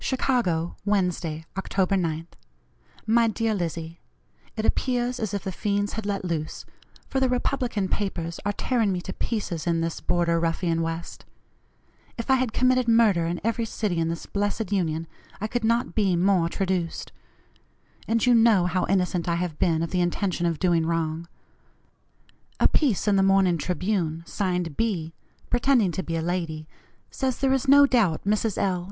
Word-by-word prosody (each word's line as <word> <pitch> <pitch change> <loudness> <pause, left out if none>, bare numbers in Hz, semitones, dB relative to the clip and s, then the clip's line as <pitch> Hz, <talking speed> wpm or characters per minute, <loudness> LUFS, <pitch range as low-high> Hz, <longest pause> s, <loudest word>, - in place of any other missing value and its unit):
"CHICAGO, 230 -11 0
Wednesday, 180 -6 -1
October 195 0 0
9th. 165 -2 -2 0.7
"MY 230 +1 +4
DEAR 225 0 0
LIZZIE: 165 -3 -4 0.6
It 215 - -1
appears 250 0 0
as 215 -3 -2
if 200 -1 -3
the 190 - -3
fiends 205 +2 -1
had 220 -2 -4
let 200 -2 -2
loose, 160 -3 -3 0.4
for 265 - -1
the 260 -1 +2
Republican 245 -5 -1
papers 170 -5 -3
are 205 - 0
tearing 225 0 0
me 180 - -1
to 190 - -6
pieces 180 -8 -3
in 165 -1 +1
this 165 0 -3
border 170 -1 +1
ruffian 165 0 0
West. 165 +1 -5 0.9
If 230 +3 -2
I - - +7
had 255 -3 0
committed 255 +1 +2
murder 215 -7 +4
in 170 +1 -2
every 230 +1 0
city 210 -6 -2
in 165 - +1
this 165 0 -4
blessed 205 0 -2
Union, 165 -5 0 0.3
I 210 - -3
could 240 +2 -2
not 230 +2 +1
be 195 -5 +2
more 180 -1 +2
traduced. 185 -2 -2 1.0
And 230 +1 +2
you 250 - +5
know 225 -6 +5
how 180 +1 0
innocent 180 -2 +1
I 170 - +1
have 170 -3 -3
been 165 -2 +2
of 165 - -4
the 180 - +1
intention 175 0 0
of 165 -2 -1
doing 175 -2 +2
wrong. 165 0 -2 1.3
A - - +6
piece 255 - +1
in 200 -1 +4
the - - +4
morning 185 -3 +3
Tribune, 175 -1 -1
signed 180 -6 -2
'B,' 180 -8 -1 0.4
pretending 245 -6 +3
to 190 - -3
be 165 -2 -4
a 165 - -1
lady, 165 -3 -3 0.4
says 260 -2 -1
there 270 -1 +2
is 270 0 0
no 285 +1 +8
doubt 225 - +2
Mrs. 210 +1 0
L. 185 -2 +1
190 Hz, 170 wpm, -25 LUFS, 170-225 Hz, 1.3 s, no